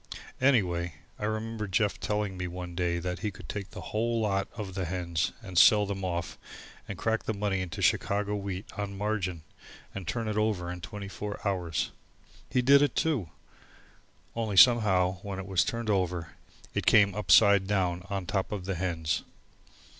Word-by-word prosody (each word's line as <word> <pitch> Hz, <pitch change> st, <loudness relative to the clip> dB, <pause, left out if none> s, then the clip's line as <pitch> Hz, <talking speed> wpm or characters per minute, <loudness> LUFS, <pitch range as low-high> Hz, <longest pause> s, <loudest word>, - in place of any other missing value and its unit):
Anyway, 90 Hz, -, +2 dB, 0.2 s
I 105 Hz, -, -2 dB
remember 110 Hz, 0 st, -3 dB
Jeff 100 Hz, +2 st, 0 dB
telling 105 Hz, -2 st, -1 dB
me 90 Hz, 0 st, -3 dB
one 90 Hz, 0 st, -6 dB
day 85 Hz, 0 st, 0 dB
that 90 Hz, 0 st, -3 dB
he 105 Hz, -, -2 dB
could 95 Hz, -, -12 dB
take 100 Hz, -2 st, -5 dB
the -, -, -9 dB
whole 115 Hz, +2 st, +1 dB
lot 100 Hz, -3 st, 0 dB
of 105 Hz, -5 st, -6 dB
the 95 Hz, -1 st, -2 dB
hens 85 Hz, 0 st, -1 dB
and 95 Hz, -4 st, +1 dB
sell 105 Hz, +2 st, +7 dB
them 100 Hz, -1 st, -4 dB
off 85 Hz, -3 st, -3 dB, 0.5 s
and 100 Hz, -, -6 dB
crack 110 Hz, +2 st, -1 dB
the 110 Hz, -, -1 dB
money 100 Hz, -2 st, -1 dB
into 90 Hz, -3 st, -4 dB
Chicago 105 Hz, +1 st, +1 dB
wheat 100 Hz, -1 st, -4 dB
on 100 Hz, -1 st, -4 dB
margin 95 Hz, -5 st, -2 dB, 0.5 s
and 95 Hz, -3 st, -7 dB
turn 115 Hz, -2 st, -2 dB
it 105 Hz, -1 st, -2 dB
over 105 Hz, -5 st, 0 dB
in 90 Hz, 0 st, -7 dB
twenty 100 Hz, +3 st, -7 dB
four 100 Hz, +1 st, -6 dB
hours. 90 Hz, -5 st, -1 dB, 0.6 s
He 125 Hz, -, +1 dB
did 140 Hz, +2 st, +7 dB
it 145 Hz, -3 st, +2 dB
too. 135 Hz, -, 0 dB, 1.1 s
Only 110 Hz, -4 st, -2 dB
somehow 95 Hz, -6 st, +5 dB
when 100 Hz, -1 st, -5 dB
it 95 Hz, -, -5 dB
was 95 Hz, -2 st, +2 dB
turned 115 Hz, -2 st, -2 dB
over 90 Hz, -4 st, -1 dB, 0.4 s
it -, -, -2 dB
came 100 Hz, -3 st, +6 dB
upside 100 Hz, -1 st, +5 dB
down 90 Hz, -3 st, 0 dB
on 95 Hz, -2 st, -3 dB
top 95 Hz, +1 st, -1 dB
of 100 Hz, -4 st, -4 dB
the 95 Hz, -, -1 dB
hens. 85 Hz, -3 st, -1 dB
100 Hz, 175 wpm, -29 LUFS, 90-105 Hz, 1.1 s, sell